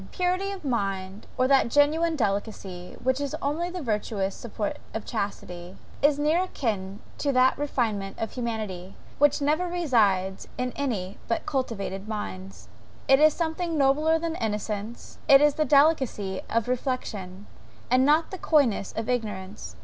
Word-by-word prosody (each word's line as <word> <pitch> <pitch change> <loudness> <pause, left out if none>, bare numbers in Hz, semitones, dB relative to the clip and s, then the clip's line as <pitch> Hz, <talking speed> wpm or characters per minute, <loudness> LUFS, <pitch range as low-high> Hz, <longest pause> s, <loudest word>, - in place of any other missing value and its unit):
Purity 365 +2 0
of 390 -5 -7
mind, 195 -4 -2
or 255 - +3
that 270 -3 +4
genuine 315 +5 +3
delicacy, 200 -6 -3
which 260 +2 +1
is 285 - -1
the - - -6
only 315 +5 -1
virtuous 215 - -2
support 215 -3 -4 0.2
of 220 - -4
chastity, 185 -4 -5 0.2
is 290 0 +4
near 305 +4 +2
a 370 - -1
kin 205 - -3 0.2
to 285 - +1
that 255 0 +4
refinement 225 -9 -2
of 225 - -3
humanity, 215 -6 -4 0.2
which 290 0 +4
never 310 +5 +1
resides 215 - +1
in 250 0 -2
any 210 -9 -3
but 230 - -1
cultivated 210 -7 -3
minds. 195 -3 -6 0.4
It 270 0 +6
is 310 0 +6
something 330 0 -2
nobler 300 +4 +3
than 330 0 -3
innocence; 210 +1 -4
it 275 - +9
is 295 0 +4
the 310 - 0
delicacy 270 -10 +3
of 230 0 0
reflection, 215 -7 -3 0.5
and 255 +1 +5
not 305 +4 +3
the 375 - -6
coyness 265 - +2
of 225 0 -4
ignorance. 210 -5 -4
245 Hz, 150 wpm, -26 LUFS, 200-295 Hz, 0.5 s, it